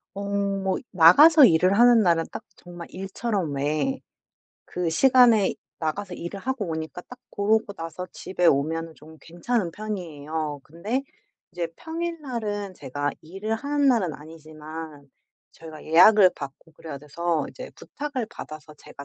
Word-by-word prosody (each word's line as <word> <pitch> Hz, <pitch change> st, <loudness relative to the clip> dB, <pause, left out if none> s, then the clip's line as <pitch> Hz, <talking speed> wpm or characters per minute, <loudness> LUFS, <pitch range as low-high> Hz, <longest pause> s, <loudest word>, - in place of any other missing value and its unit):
어 200 Hz, -, -5 dB
뭐 195 Hz, -1 st, -1 dB
이 -, -, -10 dB
나가서 280 Hz, -, +8 dB
일을 180 Hz, -1 st, +4 dB
하는 240 Hz, -2 st, +6 dB
날은 165 Hz, -3 st, +2 dB
딱 -, -, -7 dB
정말 175 Hz, -1 st, -11 dB
일처럼 195 Hz, -3 st, -3 dB
왜 155 Hz, -, -1 dB, 0.7 s
그 180 Hz, -1 st, -3 dB
시간에 235 Hz, +2 st, +4 dB, 0.3 s
나가서 180 Hz, +4 st, -3 dB
일을 175 Hz, +4 st, -7 dB
하고 260 Hz, -1 st, -3 dB
오니까 160 Hz, +1 st, -5 dB
딱 250 Hz, -, -13 dB
그러고 210 Hz, 0 st, 0 dB
나서 165 Hz, +2 st, -7 dB
집에 180 Hz, -2 st, -2 dB
오면은 160 Hz, +2 st, +1 dB
좀 160 Hz, +1 st, -16 dB
괜찮은 175 Hz, +3 st, -2 dB
편이에요. 160 Hz, -7 st, -5 dB
근데 205 Hz, -, -3 dB, 0.5 s
이제 170 Hz, -2 st, -4 dB
평일 335 Hz, 0 st, -5 dB
날은 210 Hz, -7 st, -4 dB
제가 145 Hz, -3 st, -4 dB
일을 195 Hz, +7 st, -4 dB
하는 285 Hz, +4 st, 0 dB
날은 215 Hz, -, +2 dB
아니지만 155 Hz, -1 st, -10 dB, 0.4 s
저희가 160 Hz, -2 st, -12 dB
예약을 185 Hz, +4 st, +7 dB
받고 140 Hz, +3 st, -10 dB
그래야 155 Hz, -2 st, -9 dB
돼서 155 Hz, +3 st, -2 dB
이제 -, -, -9 dB
부탁을 285 Hz, -4 st, -5 dB
받아서 155 Hz, 0 st, -10 dB
제가 140 Hz, -1 st, -12 dB
180 Hz, 300 characters per minute, -25 LUFS, 160-220 Hz, 0.7 s, 나가서